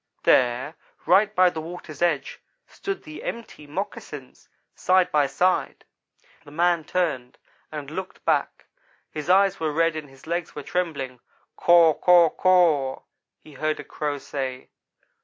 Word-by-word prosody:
There, 125 +5 +2 0.3
right 210 +3 +4
by 185 -1 +5
the 160 -2 -5
water's 160 -2 -9
edge, 170 -5 0 0.3
stood 390 -1 -6
the 310 0 -10
empty 230 -10 -7
moccasins, 150 -5 -7 0.2
side 185 0 +2
by 145 -2 +3
side. 180 +6 0 0.6
"The - - -14
man 170 +1 +1
turned 140 -10 -2 0.3
and 150 -2 -7
looked 190 +3 -7
back. - - 0 0.5
His 150 +2 -6
eyes 195 +1 +4
were 160 -1 -1
red 165 +1 +1
and 155 -2 -7
his 135 0 -18
legs 170 +1 -3
were - - -6
trembling. 140 -8 -3 0.4
'Caw 170 -2 +5
caw, 175 +1 +5
caw,' 165 -8 +2 0.4
he 155 - -15
heard 155 +3 -2
a - - -6
Crow 145 -1 -4
say. 135 -2 -5
160 Hz, 140 wpm, -24 LUFS, 145-180 Hz, 0.6 s, by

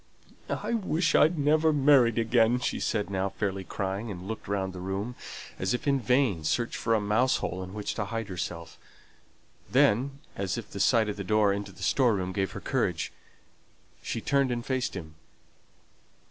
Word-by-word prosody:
"I - - -2
wish 180 -6 +1
I'd 160 +3 +5
never 155 +2 +3
married 135 -6 +4
again," 115 +1 +3
she - - -2
said, 105 -3 -1
now 95 0 0
fairly 95 -1 -3
crying, 95 +5 -3
and 95 -2 -7
looking 110 -2 -5
round 95 -2 -1
the 90 - -7
room, 95 +6 -3 0.5
as 95 +5 +1
if 125 - -5
in 140 -1 +3
vain 125 - +2
search 120 +9 0
for 115 0 +1
a - - +2
mouse 110 +5 +2
hole 90 +2 -3
in 95 +2 -8
which 105 -1 -3
to 105 - -2
hide 115 +1 -4
herself. 85 -3 -6 0.9
Then, 135 +6 +3 0.2
as 95 +1 -2
if 115 -3 -7
the 100 - -6
sight 110 +1 +4
of 105 - -3
the 100 - -4
door 105 +1 +3
into 100 0 -4
the 95 - -11
store 125 -5 +3
room 95 -1 -2
gave 95 -1 -2
her - - -5
courage, - - -1 0.9
she 115 - -3
turned 140 +1 +2
and 120 -1 -2
faced 130 -5 -1
him. 80 -4 -7
110 Hz, 185 wpm, -28 LUFS, 95-125 Hz, 0.9 s, I'd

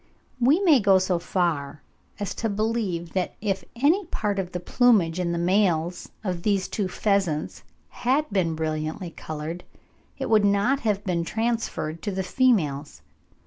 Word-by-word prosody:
We 270 +8 +4
may 325 -9 +6
go 195 -3 +5
so 185 -2 +1
far 155 -6 -1 0.4
as 205 -2 -3
to 225 - -2
believe 200 -5 -2
that 185 -2 -1
if 195 -2 -2
any 315 - +3
part 205 - -2
of 180 -2 -3
the 180 - -3
plumage 185 -4 +3
in 175 -1 0
the 170 - -1
males 175 -1 +1
of 180 -4 -2
these 200 -1 +1
two 205 -3 -2
pheasants 185 -5 -1 0.3
had 275 +5 0
been 175 -5 +1
brilliantly 155 +3 -3
coloured, 155 +3 -6 0.5
it - - -3
would 220 -2 +4
not 205 +7 +2
have 210 -5 -1
been 175 -3 -1
transferred 220 -7 -2
to 205 - -3
the 190 0 -2
females. 155 - +1
190 Hz, 155 wpm, -25 LUFS, 170-220 Hz, 0.5 s, may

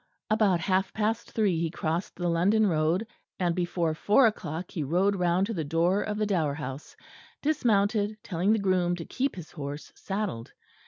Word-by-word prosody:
About 205 -6 +3
half 190 +2 +1
past 220 +2 -1
three 200 -7 +1
he 165 0 0
crossed 165 +2 -3
the 175 0 -2
London 190 +6 +3
road, 165 +3 +1 0.3
and 175 -2 +1
before 175 -2 0
four 210 +10 +4
o'clock 175 -6 -2
he 165 - -3
rode 180 +8 +2
round 180 +1 +2
to 225 - -4
the 165 -6 -2
door 170 +6 +1
of 210 0 -3
the 215 - +1
Dower 165 -8 0
House, 140 -1 -7 0.5
dismounted, 215 -7 +1
telling 180 +2 0
the 220 - +4
groom 185 -3 +1
to 165 -2 -7
keep 270 +1 -2
his 175 -4 -9
horse 145 -1 -7
saddled. 195 - -4
180 Hz, 175 wpm, -28 LUFS, 165-210 Hz, 0.5 s, four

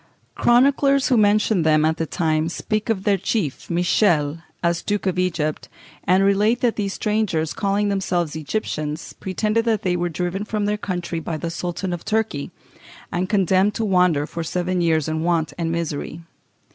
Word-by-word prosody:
Chroniclers 275 +2 +3
who 255 - +4
mention 210 -2 +3
them 155 -1 +3
at 160 +1 +1
that 165 - -3
time 160 -2 0
speak 215 +5 -3
of 200 -4 0
their 200 -2 +2
chief, 180 - -2
Michel, 170 -3 +2 0.2
as 170 0 +1
Duke 205 -1 -2
of 180 -1 0
Egypt, 165 -4 -1 0.4
and 185 +2 +4
relate 210 +4 +2
that 240 -2 +2
these 200 -2 -2
strangers, 210 -7 0
calling 200 0 0
themselves 175 -5 -1
Egyptians, 155 -2 -4
pretended 215 +4 -1
that 225 -3 +1
they 180 -2 +1
were 175 0 -1
driven 180 +4 -3
from 210 -1 -2
their 210 0 +1
country 180 -4 -3
by 160 0 -4
the 165 +1 -4
Sultan 175 +2 -3
of 175 - -5
Turkey, 220 -10 -1 0.6
and 180 +1 -1
condemned 195 0 +2
to 225 - -1
wander 180 -7 +3
for 165 +1 -5
seven 180 +2 -1
years 160 -3 +2
in 155 0 -2
want 165 -2 0
and 165 -1 -1
misery. 165 0 -4
180 Hz, 170 wpm, -22 LUFS, 165-210 Hz, 0.6 s, who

